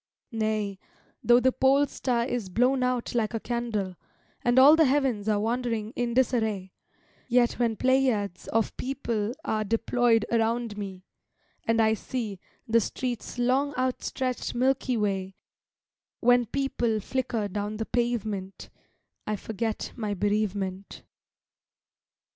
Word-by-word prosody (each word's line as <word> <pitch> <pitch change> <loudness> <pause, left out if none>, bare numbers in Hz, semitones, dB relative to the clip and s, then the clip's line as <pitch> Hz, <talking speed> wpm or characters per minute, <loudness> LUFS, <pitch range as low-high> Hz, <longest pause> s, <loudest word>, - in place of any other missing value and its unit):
Nay, 215 -3 -1 0.4
though 240 0 +6
the 260 +1 +3
pole 270 +3 +4
star 245 -4 -1
Is 240 -6 -3
blown 250 +7 +2
out 250 -1 -1
like 230 -1 0
a - - -1
candle, 220 -6 -2 0.5
And 240 +1 +2
all 280 +4 +9
the 320 -1 +5
heavens 260 -6 +1
are 210 -1 +2
wandering 230 0 -1
in 240 -1 -1
disarray, 220 -7 +1 0.6
Yet 245 -1 +2
when 230 -2 +1
pleiads 250 -7 +1
of 225 -1 0
people 240 -4 -2
are 215 0 0
Deployed 230 +1 +2
around 230 -1 0
me, 195 -3 -7 0.6
and 230 0 +2
I 220 -1 +4
see 220 -3 -4 0.3
The 230 0 +4
street's 240 +2 -4
long 265 +4 +1
outstretched 255 0 -2
Milky 255 0 +1
Way, 195 -3 -1 0.8
When 245 0 +4
people 240 -3 0
flicker 235 -1 -2
down 205 +2 -4
the 220 - -2
pavement, 215 -6 -2 0.6
I 215 - 0
forget 220 +2 -3
my 215 -4 -2
bereavement. 200 -1 -2
230 Hz, 125 wpm, -27 LUFS, 210-250 Hz, 0.8 s, all